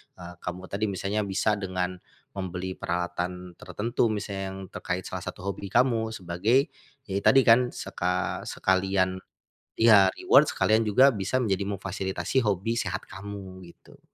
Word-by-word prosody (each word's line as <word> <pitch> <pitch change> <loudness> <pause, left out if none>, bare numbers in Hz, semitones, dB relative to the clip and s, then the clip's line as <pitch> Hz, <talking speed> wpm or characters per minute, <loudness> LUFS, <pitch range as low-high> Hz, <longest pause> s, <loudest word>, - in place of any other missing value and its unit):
eee, 90 0 -10
kamu 90 +1 -6
tadi 100 +2 -1
misalnya 100 +1 -2
bisa 100 +2 +1
dengan 90 -1 -3 0.3
membeli 95 -1 -4
peralatan 90 0 -3
tertentu 115 +3 -1
misalnya 100 -2 -3
yang - - -8
terkait 90 +1 -3
salah 95 - -5
satu 90 - -7
hobi 100 0 -4
kamu 115 0 +1
sebagai, 110 - +1 0.3
ya 100 -4 -2
tadi 135 +6 +5
kan 125 +2 +5
seka 90 -5 -3
sekalian 95 0 +1 0.6
iya 105 -4 +6
reward - - +5
sekalian 110 +1 +2
juga 130 +7 +6
bisa 100 0 -3
menjadi 100 -3 0
memfasilitasi 95 +4 -2
hobi 105 +4 0
sehat 90 -1 -3
kamu 95 -1 -8 0.2
gitu. - - -20
95 Hz, 140 wpm, -27 LUFS, 95-110 Hz, 0.6 s, iya